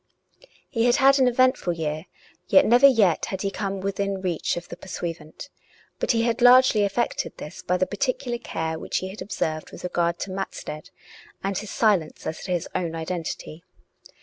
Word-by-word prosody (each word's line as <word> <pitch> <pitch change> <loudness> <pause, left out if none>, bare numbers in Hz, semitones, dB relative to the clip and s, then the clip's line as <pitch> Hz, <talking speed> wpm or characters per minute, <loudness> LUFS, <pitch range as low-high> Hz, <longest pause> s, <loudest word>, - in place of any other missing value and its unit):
He 230 -3 0
had 245 - +4
had 275 0 +5
an 260 - +5
eventful 250 -7 +2
year, 155 +1 -4 0.4
yet 285 - +6
never 245 +4 +7
yet 210 - +3
had 190 0 -4
he 195 - -1
come 195 -2 -3
within 200 0 -2
reach 180 -4 -1
of 175 - -6
the - - -8
pursuivant. 170 - -7 0.5
But - - -2
he 230 -1 +3
had 235 +1 0
largely 250 -2 +7
effected 205 +4 -1
this 150 - -8
by 180 - 0
the 185 - +2
particular 240 +4 -2
care 160 -7 -4
which - - -3
he 185 - -3
had 195 - -9
observed 155 -5 -3
with - - -11
regard 170 -1 0
to 190 - -4
Matstead, 170 -5 -6 0.5
and 195 0 -1
his 210 +2 -4
silence 200 -9 +1
as 160 - -5
to 185 - -4
his 175 -2 -1
own 170 -2 -2
identity. 165 -1 -5
195 Hz, 180 wpm, -24 LUFS, 170-235 Hz, 0.5 s, never